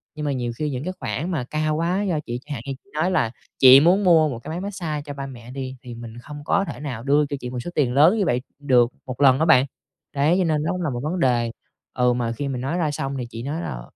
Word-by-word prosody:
Nhưng 150 - -4
mà 145 - 0
nhiều 120 -3 -2
khi 150 +2 -2
những 130 0 -4
cái 185 +2 -3
khoản 170 +6 -3
mà 145 -7 -1
cao 155 +3 -1
quá 175 +5 0
do 175 -6 0
chị 120 +1 -4
chẳng 150 - -5
hạn 115 - -5
như 135 - -3
chị 200 - -29
nói 170 +5 +1
là 115 -11 +1 0.3
"Chị 130 +1 +10
muốn 180 +6 +4
mua 160 -4 +5
một 120 -3 -5
cái 120 - -10
máy 165 +3 -3
mát 200 - -3
xa 155 -5 -3
cho 145 - -6
ba 140 -1 -5
mẹ" 120 -2 -11
đi, 130 -1 -5
thì 120 -1 -8
mình 115 0 -9
không 145 +4 -9
có 200 +3 +2
thể 125 - -7
nào 125 -6 -5
đưa 145 +2 +3
cho 140 0 -4
chị 125 - -6
một 125 -1 -4
số 150 - -5
tiền 130 -5 +2
lớn 160 +10 +5
như 200 - +1
vậy 125 -6 +1 0.2
được 125 -4 +4 0.2
1 130 +1 -6
lần 135 0 +6
á 160 - +3
bạn. 135 -5 +6 0.5
Đấy, 150 +5 +3
cho - - +3
nên 155 -3 +1
nó 165 - 0
cũng 180 -1 -3
là 160 - 0
một 120 -2 -3
vấn 175 +4 -2
đề, 120 -5 +2 0.4
ừ, 125 -1 +2
mà 120 -1 -1
khi 140 +5 -4
mình 130 -3 -3
nói 150 +7 -2
ra 155 -4 0
xong 135 -1 -3
thì 125 - -3
chị 115 0 -7
nói 155 +5 -3
là - - -5
140 Hz, 300 wpm, -23 LUFS, 125-160 Hz, 0.5 s, Chị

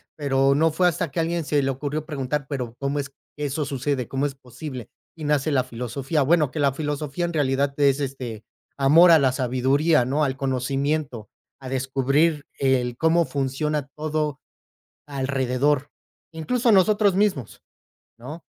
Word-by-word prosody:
pero, 135 -2 +2
no 160 +2 +3
fue 180 +3 +2
hasta 165 -3 -1
que - - -3
alguien 165 +1 -1
se 145 -1 +1
le 135 - 0
ocurrió 145 +3 -4
preguntar, 145 -1 -3
pero, 125 -5 -4
¿cómo 140 +1 -1
es 140 - -4
que 145 +1 -9
eso 145 +2 -2
sucede? 135 -2 -2
¿Cómo 135 +1 -1
es 140 - -8
posible? 130 -1 -9 0.3
Y 155 - -8
nace 150 +1 +1
la 130 -3 +2
filosofía, 130 +5 -3
bueno, 150 -2 +2
que 160 - -5
la 140 -1 +3
filosofía 150 +2 -3
en 170 - -4
realidad 140 -2 +1
es 140 -1 +3
este 125 -6 -5 0.3
amor 150 +6 +6
a 165 - +8
la 135 -2 +3
sabiduría, 130 +3 +2
no 145 +4 0
al 135 -1 -1
conocimiento, 135 -2 -2 0.3
a 135 - -9
descubrir 135 +4 +1
el 130 -3 +1
cómo 165 +1 +3
funciona 140 +1 -2
todo 155 -2 -2 0.7
alrededor, 135 0 0 0.4
incluso 235 - +1
nosotros 205 +1 +4
mismos, 190 - -1 0.6
¿no? 145 +8 -9
140 Hz, 160 wpm, -23 LUFS, 130-155 Hz, 0.7 s, a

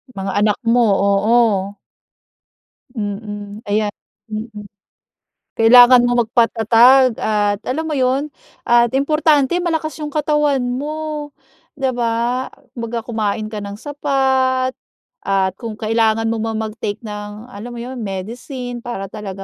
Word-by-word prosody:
Mga 195 0 -3
anak 210 0 +2
mo, 235 0 +3
oo. 200 0 +2 1.2
Mm. 205 0 -5
Ayan 210 0 0 0.4
mm. 215 0 -6 1.0
Kailangan 245 +2 +8
mong 245 -1 +2
magpatatag 235 +2 +4
at 205 -1 0
alam 295 +6 -1
mo 315 - -4
yun 275 +1 0 0.3
at 240 +1 +3
importante 305 +2 +2
malakas 320 -3 -2
yung 300 - -4
katawan 295 -3 +1
mo, 295 +3 -4 0.4
'di 270 -2 -1
ba? 240 +1 -1 0.2
Kumbaga, 230 -1 -5
kumain 215 -2 -2
ka 215 - -4
ng 200 0 -6
sapat, 265 -1 0 0.5
at 195 -1 0
kung 230 -3 -6
kailangan 225 +1 +1
mo 230 - -2
mang 225 0 -2
mag-take 215 0 -5
ng 210 +2 -8
alam 230 +4 -8
mo - - -7
'yon, 250 +1 -6
medicine 240 +5 -6
para 200 -5 -6
talaga 195 -3 -7
235 Hz, 125 wpm, -18 LUFS, 210-260 Hz, 1.2 s, Kailangan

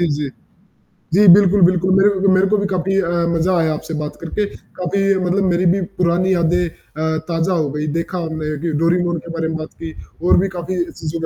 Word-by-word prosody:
जी, 175 - +2
जी, 150 -2 -3 0.9
जी 205 +1 +5
बिल्कुल, 200 0 +4
बिल्कुल, 185 +1 +1
मेरे 200 +2 +5
को 195 - +3
मेरे 185 +1 +3
को - - +4
भी 200 - -1
काफ़ी 195 0 -1
अ, 170 - -3 0.2
मज़ा 175 +2 +1
आया 160 -1 +1
आपसे 160 +1 -7
बात 150 -1 -5
करके 205 +5 -2 0.3
काफ़ी 195 +2 -1 0.2
मतलब 190 +3 +1
मेरी 175 +1 +1
भी 195 - -2 0.2
पुरानी 180 +2 +2
यादें 175 +1 +1
अ, 160 0 -4
ताज़ा 170 +2 0
हो 155 -4 0
गई 150 +1 -3
देखा 170 +2 -3
हमने 155 -2 -4
कि 170 -1 -1
डोरी 170 +2 +2
मोन 175 -1 -1
के 170 - -7
बारे 165 -1 -2
में 160 0 -3
बात 155 0 -8
की 160 - -6 0.3
और - - +5
भी 195 - +1
काफ़ी 175 +1 -2
चीज़ों 160 +1 -5
175 Hz, 220 wpm, -18 LUFS, 160-185 Hz, 0.9 s, जी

